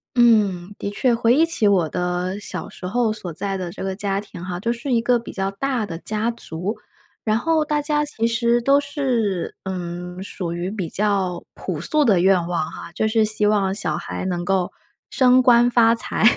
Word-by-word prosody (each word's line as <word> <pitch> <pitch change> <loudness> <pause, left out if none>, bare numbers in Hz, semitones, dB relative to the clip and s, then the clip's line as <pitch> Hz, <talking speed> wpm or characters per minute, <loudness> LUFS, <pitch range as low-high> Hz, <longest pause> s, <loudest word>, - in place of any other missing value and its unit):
嗯， 205 -6 +3
的 - - -3
确， 240 +5 +1
回 230 +1 +3
忆 320 +3 +5
起 330 -10 +1
我 185 -5 +3
的 180 +3 -2
小 - - -5
时 180 - -8
候 230 +2 +1
所 200 -5 -6
在 195 +4 -3
的 180 -2 -4
这 190 - -7
个 190 0 -2
家 195 -1 -1
庭 200 -4 -10
哈， 180 -1 -4
就 235 +5 -1
是 240 +3 -5
一 235 - +3
个 240 +1 +2
比 230 - -9
较 195 0 -2
大 250 +2 -2
的 165 -5 -6
家 215 +4 -1
族， 190 -1 -3 0.5
然 215 -1 +1
后 320 +5 +1
大 295 0 0
家 295 0 +1
其 290 -6 -2
实 235 +1 +2
都 275 +4 +4
是 255 - -1
嗯， 180 -1 -5
属 180 -3 -5
于 175 +2 -3
比 190 -6 -4
较 195 -3 -1
朴 175 -5 -5
素 300 - +2
的 205 -9 +4
愿 180 -1 +3
望 165 -2 -2
哈， - - -9
就 220 - 0
是 220 0 +2
希 215 0 +2
望 200 -2 +2
小 160 -7 0
孩 - - -5
能 175 -2 -2
够 185 0 0 0.4
升 255 -1 +5
官 240 -1 +5
发 230 -2 +5
财， 230 - 0
205 Hz, 220 characters per minute, -22 LUFS, 180-235 Hz, 0.5 s, 忆